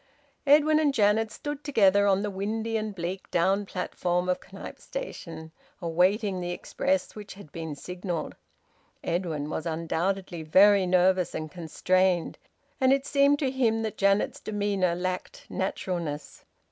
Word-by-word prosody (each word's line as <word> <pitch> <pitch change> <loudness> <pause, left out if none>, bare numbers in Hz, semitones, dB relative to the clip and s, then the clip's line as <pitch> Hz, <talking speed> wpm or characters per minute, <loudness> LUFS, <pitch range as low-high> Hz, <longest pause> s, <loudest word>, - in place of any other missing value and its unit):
Edwin 305 +2 +6
and 300 -2 +3
Janet 215 +1 +3
stood 290 +4 -6
together 200 -7 +4
on 195 0 +3
the 205 - -2
windy 220 +4 -2
and 215 -2 -2
bleak 180 +2 -5
down 195 +4 +1
platform 180 -1 -1
of 180 - +1
Knype - - -9
Station, 165 - -7 0.3
awaiting 185 +4 +1
the 175 - -3
express, 275 +10 -1
which 210 -2 -9
had 195 -7 -13
been 160 -2 -5
signalled. 180 +2 -5 0.7
Edwin 165 -4 -2
was 160 +2 -4
undoubtedly 170 +2 -2
very 190 +4 +5
nervous 185 0 +3
and 155 -1 -4
constrained, 180 +1 0 0.4
and 260 -1 +4
it 275 0 +2
seemed 280 0 +4
to 275 -3 0
him 225 -4 +1
that 220 -2 -3
Janet's 200 +1 +2
demeanour 200 -4 0
lacked 185 +1 -4
naturalness. 175 -5 -4
190 Hz, 140 wpm, -27 LUFS, 175-215 Hz, 0.7 s, Edwin